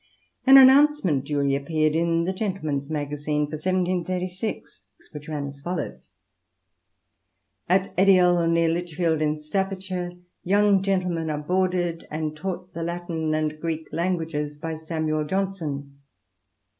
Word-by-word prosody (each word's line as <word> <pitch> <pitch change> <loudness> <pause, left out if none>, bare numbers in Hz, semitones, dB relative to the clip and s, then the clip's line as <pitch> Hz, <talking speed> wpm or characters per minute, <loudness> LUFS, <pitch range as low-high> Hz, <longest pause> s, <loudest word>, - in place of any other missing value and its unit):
An 270 +1 +10
announcement 265 - +6
duly 140 -1 +1
appeared 155 +2 0
in 165 0 +1
the 185 +3 -1
GentlematCs 155 -9 -3
Magazine 150 0 -2
for 145 - -12
1736, 185 +3 -2 0.3
which 150 0 -9
ran 150 -2 -3
as 140 0 -9
follows: 175 0 -5 0.8
— 100 +3 -47
"At 190 +2 +2
Edial, 180 -3 +5
near 165 0 +3
Lichfield 165 -1 0
in 150 0 +1
Staffordshire, 185 +2 -3 0.3
young 200 +1 +3
gentlemen 180 -4 -1
are 150 - -1
boarded 175 +1 -1
and 155 0 -3
taught 180 +1 -5
the 165 - -5
Latin 165 -2 -2
and 155 0 -2
Greek 160 -1 -4
Languages, 160 -4 -2
by 160 +2 -4
Samuel 155 -1 -2
Johnson." 150 -7 -3
165 Hz, 125 wpm, -24 LUFS, 150-185 Hz, 0.8 s, An